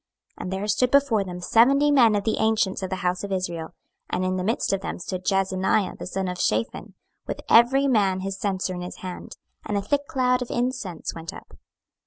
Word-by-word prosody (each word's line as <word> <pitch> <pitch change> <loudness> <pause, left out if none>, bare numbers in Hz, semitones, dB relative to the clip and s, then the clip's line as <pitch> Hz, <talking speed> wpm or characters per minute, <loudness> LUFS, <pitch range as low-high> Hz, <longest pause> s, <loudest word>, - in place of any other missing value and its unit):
26:008:011 - - -5
And 185 - -4
there 195 +2 -3
stood 245 +4 +2
before 275 -6 +3
them 180 -2 -7
seventy 275 +9 +4
men 235 -6 +5
of 205 - 0
the 220 - 0
ancients 220 -3 +1
of 190 - -3
the 190 - -2
house 180 +2 0
of 200 - -5
Israel, 175 -3 -3 0.3
and 185 - -1
in 185 0 0
the 185 - -2
midst 220 0 0
of 195 - -1
them - - -4
stood 185 +1 -5
Jaazaniah 190 +1 +1
the - - -6
son 190 +1 -2
of 180 0 -4
Shaphan, 110 +2 -1 0.3
with - - -4
every 260 +4 +5
man 195 -7 +2
his 195 0 -4
censer 190 -2 -1
in 180 - -5
his 180 - -8
hand; 180 -1 -7 0.3
and 205 - -2
a - - 0
thick 285 +7 -1
cloud 250 -1 +1
of 250 - -4
incense 240 -9 -3
went 165 +2 -7
up. - - -13
195 Hz, 220 wpm, -24 LUFS, 185-235 Hz, 0.3 s, men